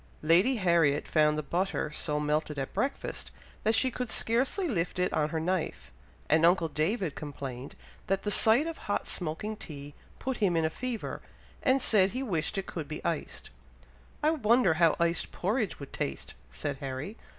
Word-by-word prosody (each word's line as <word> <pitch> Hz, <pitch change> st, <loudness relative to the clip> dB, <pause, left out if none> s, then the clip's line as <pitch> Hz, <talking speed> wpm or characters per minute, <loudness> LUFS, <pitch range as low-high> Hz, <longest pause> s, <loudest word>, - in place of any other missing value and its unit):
Lady 180 Hz, +12 st, +4 dB
Harriet 170 Hz, -8 st, +2 dB
found 150 Hz, -1 st, +3 dB
the 155 Hz, -, -2 dB
butter 175 Hz, 0 st, -1 dB
so 150 Hz, -1 st, 0 dB
melted 150 Hz, 0 st, -1 dB
at 135 Hz, -1 st, -4 dB
breakfast, 275 Hz, +1 st, -2 dB, 0.3 s
that 220 Hz, +1 st, +3 dB
she 260 Hz, +3 st, +3 dB
could 250 Hz, 0 st, -4 dB
scarcely 260 Hz, -, +1 dB
lift 180 Hz, -, -1 dB
it 180 Hz, 0 st, +1 dB
on 150 Hz, -1 st, +1 dB
her 160 Hz, -, -2 dB
knife; 180 Hz, +1 st, -2 dB, 0.4 s
and 160 Hz, +2 st, +3 dB
uncle 170 Hz, 0 st, +4 dB
David 160 Hz, +3 st, 0 dB
complained 135 Hz, -3 st, -7 dB, 0.3 s
that 195 Hz, 0 st, 0 dB
the 205 Hz, -, 0 dB
sight 225 Hz, +8 st, +5 dB
of 330 Hz, -1 st, -5 dB
hot 205 Hz, -, 0 dB
smoking 180 Hz, +6 st, -3 dB
tea 145 Hz, -6 st, -8 dB, 0.2 s
put 265 Hz, -1 st, -3 dB
him 185 Hz, -6 st, +2 dB
in 160 Hz, -, +2 dB
a 160 Hz, -, 0 dB
fever, 250 Hz, +3 st, -4 dB, 0.4 s
and 260 Hz, 0 st, +3 dB
said 195 Hz, -4 st, +5 dB
he 260 Hz, +2 st, -2 dB
wished 190 Hz, -3 st, -1 dB
it 195 Hz, -, -2 dB
could 160 Hz, -4 st, -5 dB
be 155 Hz, -, -7 dB
iced. -, -, -3 dB, 0.7 s
"I 305 Hz, -, +4 dB
wonder 235 Hz, -, +3 dB
how 165 Hz, 0 st, +4 dB
iced 170 Hz, 0 st, +1 dB
porridge 210 Hz, +3 st, -1 dB
would 140 Hz, -, -9 dB
taste!" 70 Hz, -, -4 dB, 0.2 s
said 65 Hz, -, -4 dB
Harry. 135 Hz, +9 st, -5 dB
175 Hz, 175 wpm, -29 LUFS, 150-220 Hz, 0.7 s, sight